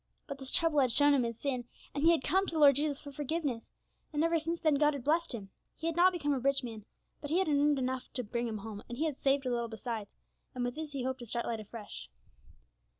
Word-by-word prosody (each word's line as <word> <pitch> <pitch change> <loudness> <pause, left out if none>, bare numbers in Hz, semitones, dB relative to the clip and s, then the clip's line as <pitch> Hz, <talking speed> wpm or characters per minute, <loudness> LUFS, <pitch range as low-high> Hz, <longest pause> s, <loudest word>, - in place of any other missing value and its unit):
But 280 -2 -7
this 265 -1 -7
trouble 325 -1 +3
had 255 -3 +3
shown 290 +3 +7
him 275 - +3
his 235 -2 -2
sin, 255 -4 -2 0.3
and 285 - -2
he 330 - +7
had 330 -6 +3
come 380 +5 +2
to 330 - -4
the - - +1
Lord 285 -2 +7
Jesus 290 -1 0
for 285 - -10
forgiveness, 290 -4 -3 0.4
and 300 0 0
ever 330 0 +2
since 330 +2 -2
then 310 -2 +3
God 295 +1 +3
had 270 - -6
blessed 330 +4 +1
him. 195 -4 -9 0.2
He 320 - -7
had 330 -1 0
not 360 +2 +6
become 295 -5 -1
a 270 - 0
rich 275 +1 +1
man, 220 -4 -7 0.4
but 290 - -6
he 325 - +2
had 380 - +2
earned 290 -1 +3
enough 260 -1 -3
to 250 - -1
bring 235 +2 -2
him 220 -2 -3
home, 210 0 -7
and 240 - -6
he 315 - 0
had 300 -4 -3
saved 275 0 +2
a 250 - 0
little 235 -1 -1
besides, 220 -2 -6 0.4
and 250 - -2
with 245 - -2
this 305 0 -6
he 270 -3 -3
hoped 260 +1 -2
to 240 - -9
start 235 +2 -3
life 230 -1 -2
afresh. 210 - -9
275 Hz, 270 wpm, -32 LUFS, 240-305 Hz, 0.4 s, shown